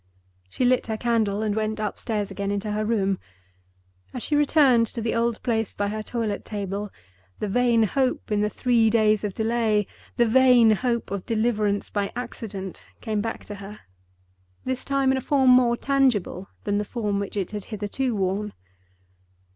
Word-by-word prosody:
She 250 - -1
lit 250 -1 +2
her 220 -1 -2
candle 220 -3 0
and 210 -1 0
went 215 0 -1
upstairs 210 0 -2
again 200 -1 -3
into 205 +1 -2
her 210 +1 -1
room. 200 -4 0 1.0
As - - -4
she 300 - 0
returned 280 -5 +4
to 230 - -6
the 225 0 -1
old 230 -1 0
place 225 -4 -1
by 205 0 -1
her 215 +1 -3
toilet 215 -2 -3
table, 205 0 -4 0.5
the 210 - -3
vain 235 +1 +3
hope 255 +1 0
in 205 -1 +2
the 210 - +1
three 230 +1 +2
days 215 -2 +3
of 205 -2 -3
delay, 220 -2 +1 0.3
the 240 - +4
vain 245 -1 +6
hope 235 0 0
of 200 -2 -4
deliverance 215 -3 0
by 200 -1 -1
accident, 210 -6 -6 0.2
came 215 -3 -2
back 225 +1 -5
to 205 - -7
her—this 95 - -10
time 275 -1 +1
in 265 - +1
a - - -6
form 265 -1 +3
more 245 -1 +5
tangible 245 -10 +1
than 205 0 0
the - - 0
form 210 -2 -2
which 200 +1 -4
it 195 - -2
had 210 -2 -5
hitherto 220 +4 -2
worn. 200 +2 -1
215 Hz, 170 wpm, -24 LUFS, 205-240 Hz, 1.0 s, vain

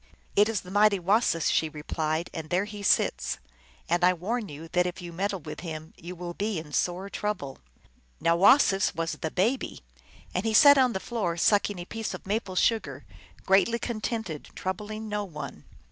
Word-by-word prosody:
" - - -33
It 210 +2 +5
is 220 -4 -1
the 180 - -11
mighty 205 0 +4
Wasis" 185 -2 +2
she 160 - +1
replied, 155 +2 -3
" - - -33
and 160 -1 -6
there 185 +3 +1
he 210 -1 -8
sits; 60 - +1 0.5
and 175 +1 +1
I 180 +1 +6
warn 210 +5 -3
you 150 +3 -9
that 180 +1 +2
if 180 - -5
you 175 -2 -8
meddle 195 +1 -2
with 150 +1 -7
him 160 -2 -7
you 175 +2 -9
will 175 0 -6
be 205 +1 -2
in 155 -2 -7
sore 180 +5 0
trouble." 200 -10 -4 0.6
Now 165 0 +3
Wasis 195 0 +5
was 165 0 -1
the 160 - -4
Baby. 225 - -1 0.5
And 180 - -1
he 220 -1 0
sat 285 +2 +8
on 255 -2 +4
the 190 - -2
floor 195 -7 -2
sucking 205 +2 +2
a 175 - -6
piece 220 -1 -4
of - - -11
maple 200 -1 -2
sugar, 225 +4 0 0.4
greatly 195 +5 +4
con 235 -2 -4
tented, 210 -10 -3
troubling 210 +4 -4
no 210 -1 -2
one. 160 -6 -8
190 Hz, 195 wpm, -27 LUFS, 170-215 Hz, 0.6 s, sat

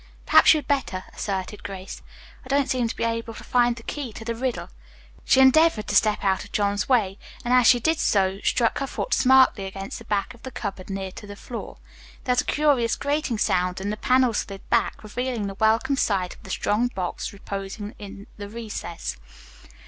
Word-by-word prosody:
"Perhaps - - +7
you'd 300 - -3
better," 265 -10 -1
assented 195 0 -4
Grace. 190 -1 -7 0.4
"I - - -13
don't 275 0 +1
seem 250 -2 +1
to - - -5
be - - -3
able 230 0 -2
to - - -10
find 240 -1 +2
the 230 - -12
key 280 -3 -5
to 225 - -9
the 230 - -1
riddle." 250 +1 -3 0.6
She - - +4
endeavored 265 -3 +5
to 205 - -1
step 210 +1 +3
out 190 -1 +1
of 205 - -14
John's 205 +1 0
way, 205 -7 +2 0.3
and 245 - +1
as 250 -2 +6
she 245 - +6
did 320 +6 +1
so, 195 -1 +2
struck 230 -2 +1
her 275 - -2
foot - - -3
smartly 255 -6 +4
against 195 0 -7
the 230 - -13
back 200 -3 -1
wall 240 - -17
of - - -26
the 260 - -7
cupboard 200 -6 -6
near 195 -1 -4
to 205 +2 -11
the 205 - -8
floor. 230 +3 -8 0.5
There 250 - +2
was 250 - +3
a - - -12
curious 280 -6 +2
grating 285 -4 -1
sound 180 -2 +1
and 200 +2 -3
the - - -2
panel 255 +2 +3
slid 195 -2 -4
back, - - +1
revealing 240 0 -3
the 195 - -4
welcome 220 +7 +2
sight 190 -7 0
of - - -19
the - - -12
strong 210 +5 +1
box 185 -7 -4
reposing 200 +1 -6
in 200 -1 -9
the 205 -1 -7
recess. 210 - -6
220 Hz, 210 wpm, -24 LUFS, 195-250 Hz, 0.6 s, Perhaps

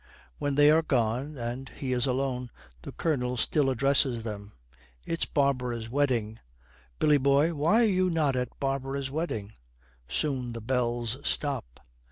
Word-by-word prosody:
When 145 -1 -1
they 145 +1 +6
are 160 +1 +5
gone 130 +1 -1
and 120 +2 -5
he 130 -2 -4
is 125 +1 +1
alone, 125 -1 -1 0.3
the - - -8
Colonel 125 -6 -1
still 140 +3 +2
addresses 130 -2 +2
them. 105 -2 -7 0.5
'It's 165 - -1
Barbara's 125 -6 0
wedding. 120 -6 0 0.6
Billy 150 -1 +4
boy, 140 +5 +3
why 165 +10 +3
are - - +5
you 185 -3 +2
not 155 -5 +1
at 125 -1 -3
Barbara's 135 0 -2
wedding?' 110 -10 -3 0.5
Soon 130 - -1
the 115 - -5
bells 120 0 -1
stop. 135 - -2
135 Hz, 145 wpm, -28 LUFS, 120-145 Hz, 0.6 s, they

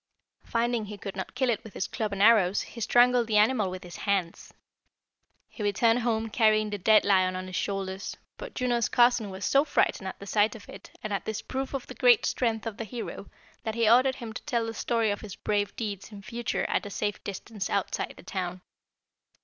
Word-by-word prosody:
Finding 235 -1 0
he 210 0 -8
could 195 0 -7
not 190 +4 -6
kill 255 -1 +2
it 220 - -2
with 220 - -12
his - - -1
club 215 -2 -3
and 200 0 0
arrows, 210 -4 +5
he 235 - -9
strangled 245 +1 +4
the 215 -2 +2
animal 210 -2 +3
with 185 0 -7
his 175 -1 -9
hands. 190 -4 -2 1.0
He - - -11
returned 225 +3 +3
home 225 -2 -1
carrying 215 -2 +3
the 205 - -3
dead 215 +3 +5
lion 185 -2 +3
on 185 0 -4
his 185 0 -7
shoulders, 195 -1 -3 0.2
but - - -9
Juno's 240 -3 +1
cousin 240 -3 +4
was 190 +1 -5
so 275 +1 +4
frightened 215 -9 +1
at - - -6
the 200 - -9
sight 210 +2 +2
of 215 - -12
it - - -11
and 215 - -3
at 195 - -2
this 220 0 -4
proof 265 +1 -4
of 265 - -4
the - - -9
great 485 -3 +5
strength 225 -3 0
of 225 -3 -4
the - - -3
hero 225 -2 -7 0.3
that 220 -1 -4
he 230 -1 +2
ordered 255 +3 +5
him 230 -4 -7
to 250 - -6
tell 235 -2 -1
the 225 - -4
story 225 0 0
of 205 - -4
his 205 -3 -8
brave 205 -1 -1
deeds 205 -3 -5
in 200 -1 -10
future 235 +2 -2
at - - -1
a - - -7
safe 205 +1 -3
distance 200 0 -5
outside 200 -1 -2
the - - -13
town." 180 -1 -4
215 Hz, 220 wpm, -28 LUFS, 200-235 Hz, 1.0 s, arrows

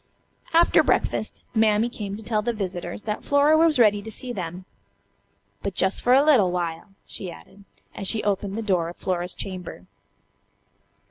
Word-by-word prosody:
After 335 +1 +5
breakfast - - -1
Mammy 220 0 +3
came 205 -4 -6
to 220 - -10
tell 215 -1 0
the 240 +2 -1
visitors 185 -3 -5
that 210 -1 -4
Flora 285 +2 +4
was 320 -2 +4
ready 210 -4 +4
to 220 - -8
see 245 +3 -7
them. 180 -2 -6 1.0
"But 200 -2 -4
jus' 190 +1 +1
for 245 - +3
a 270 +2 +6
little 235 -12 +5
while," 175 +2 -4
she 185 - -5
added, 195 +3 -14 0.3
as 195 - -4
she 220 +1 +3
opened 200 0 -1
the 225 - -3
door 180 -5 0
of 175 - -11
Flora's 180 -1 -2
chamber. 180 - -7
205 Hz, 170 wpm, -24 LUFS, 185-225 Hz, 1.0 s, a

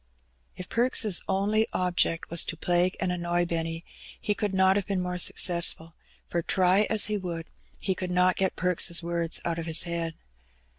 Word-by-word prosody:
If 185 - -8
Perks' 230 -5 +2
only 205 +3 +1
object 175 -3 0
was 170 - +4
to 170 - -5
plague 175 +2 +1
and 185 -1 -1
annoy 175 0 0
Benny, 165 0 -3 0.3
he 210 - -1
could 205 -1 -2
not 190 0 +3
have 200 -2 -1
been 195 -2 -1
more 180 0 -3
successful, 170 -2 +1 0.3
for 170 - -2
try 185 +4 +2
as 220 -2 +4
he 210 0 -1
would, 170 -4 -5 0.3
he 190 - -1
could 185 0 -5
not 180 0 +3
get 190 -1 -1
Perks' 175 -1 0
words 170 -1 -1
out 170 -1 -2
of 165 - -5
his 160 0 +3
head. 170 -2 -3
180 Hz, 180 wpm, -27 LUFS, 170-190 Hz, 0.3 s, was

